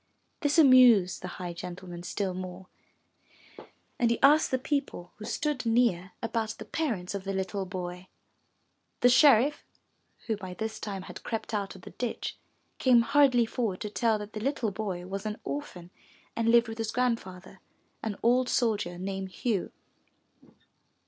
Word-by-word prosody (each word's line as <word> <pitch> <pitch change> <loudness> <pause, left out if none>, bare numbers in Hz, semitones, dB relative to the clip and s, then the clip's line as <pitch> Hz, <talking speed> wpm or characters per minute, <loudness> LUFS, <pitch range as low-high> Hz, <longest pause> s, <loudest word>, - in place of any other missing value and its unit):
This 290 -1 +1
amused 250 - +6
the 180 - -5
high 175 -1 -5
gentleman 175 0 -8
still 190 +1 -3
more, 185 0 -7 1.3
and 235 - +3
he 235 - 0
asked 300 +3 +6
the 260 - +1
people 260 -10 -3
who 215 - -8
stood 295 +1 -2
near 225 -6 +1
about 225 -1 -2
the - - -8
parents 220 - -2
of 200 -1 -4
the 195 0 -3
little 190 0 -2
boy. 180 0 -6 0.9
The 245 - +6
sheriff, 270 +1 +5 0.6
who 225 - 0
by 185 -3 -8
this 220 +2 -4
time 195 -3 -5
had - - -9
crept 225 0 -4
out 200 -2 -2
of 185 - -14
the - - -10
ditch, 245 -2 -4 0.4
came 245 -3 +5
hurriedly 255 -1 +4
forward 225 -5 -2
to 210 - -4
tell 225 -1 +2
that 210 0 -8
the 215 - -4
little 235 -2 -1
boy 190 -3 -4
was 195 +3 -4
an 210 0 -4
orphan 180 -12 -6 0.4
and 230 0 +1
lived 235 0 +5
with 225 0 -7
his 225 -1 -2
Grandfather, 195 -7 -2 0.4
an 215 -3 -4
old 250 +2 +3
soldier 210 -7 0
named 190 +1 -4
Hugh. 205 0 -2
215 Hz, 160 wpm, -29 LUFS, 185-245 Hz, 1.3 s, amused